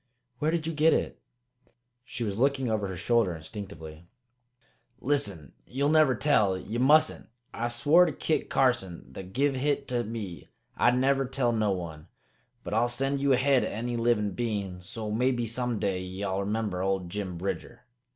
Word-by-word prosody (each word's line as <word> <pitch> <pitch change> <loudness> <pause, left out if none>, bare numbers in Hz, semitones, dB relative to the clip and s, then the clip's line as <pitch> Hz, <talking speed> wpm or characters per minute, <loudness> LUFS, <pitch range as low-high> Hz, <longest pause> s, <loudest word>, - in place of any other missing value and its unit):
"Where 150 - +1
did 165 -1 -1
you 165 - -2
get 155 +1 +4
it?" - - -3 0.8
She 120 -1 -5
was 100 -3 -2
looking 135 -2 +1
over 105 -2 0
her 95 -1 -6
shoulder 105 -2 +1
instinctively. 80 -1 -9 0.9
"Listen! 100 - -1
Ye'll 140 +3 0
never 155 -5 +5
tell? 105 -8 +2
Ye 110 +5 -5
mustn't! 150 +5 +4 0.3
I 120 - -2
swore 145 +9 +4
to - - -1
Kit 160 - -1
Carson, 115 -10 +1
that 95 +3 -8
give 140 +5 +1
hit 140 +1 -1
to 120 -1 0
me, 105 -6 -7 0.3
I'd 120 +1 +3
never 135 +1 +2
tell 130 -2 0
no 110 -2 +1
one. 85 -5 -4 0.6
But - - -5
I'll 115 +2 +3
set 135 +3 0
you 140 0 +3
ahead 130 0 +3
o' - - -1
any 120 +3 -3
livin' 115 -3 +1
bein', 100 -5 -3
so 105 +4 -6
maybe 120 +2 +1
some 120 +1 -1
day 95 -3 -1
ye'll 95 +1 -3
remember 100 -2 -2
old 95 -2 -1
Jim 95 -3 -4
Bridger. 100 +7 -5
115 Hz, 170 wpm, -28 LUFS, 95-135 Hz, 0.9 s, never